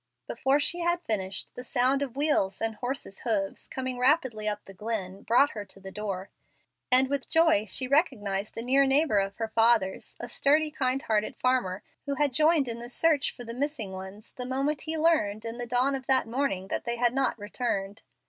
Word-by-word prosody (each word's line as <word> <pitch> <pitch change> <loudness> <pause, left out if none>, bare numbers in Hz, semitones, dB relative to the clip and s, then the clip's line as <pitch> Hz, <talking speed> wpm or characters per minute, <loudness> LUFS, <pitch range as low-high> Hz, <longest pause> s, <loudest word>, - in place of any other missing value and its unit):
Before 270 +4 +1
she 345 +4 0
had 345 0 0
finished, 195 -7 -2
the 250 - -7
sound 255 +3 +2
of 265 -3 -3
wheels 275 -10 +1
and 225 0 -1
horses' 245 -3 -5
hoofs 205 -5 -2
coming 260 -1 -4
rapidly 250 -5 +2
up 210 0 -3
the 195 - -11
glen 195 -2 -4
brought 260 +5 +4
her 210 - -5
to 195 - -16
the 190 0 -9
door, 195 -2 -5 0.6
and 260 +1 +5
with 280 -1 -3
joy 325 -10 +4
she 255 +6 0
recognized 215 - 0
a 230 - -2
near 270 +3 +4
neighbor 270 -5 +3
of 195 0 -2
her 225 -1 -2
father's, 225 -4 +2
a 240 - -5
sturdy, 300 +5 +2
kind 265 -2 0
hearted 215 -1 0
farmer, 250 -8 0 0.2
who 280 - 0
had 290 -2 +1
joined 310 0 +3
in 235 0 -4
the 240 +1 -7
search 305 +2 +2
for 245 - -10
the 230 0 -7
missing 255 -6 -2
ones 190 +3 -9
the 250 - -6
moment 275 +4 -1
he 320 0 -2
learned, 270 -10 +2
in 230 +1 -4
the 240 - -4
dawn 250 +3 +2
of 265 -2 -5
that 265 -3 +3
morning, 225 -7 -1
that - - -2
they 235 0 -1
had 240 0 +2
not 270 -2 +1
returned. 205 -1 -3
245 Hz, 205 wpm, -28 LUFS, 210-275 Hz, 0.6 s, and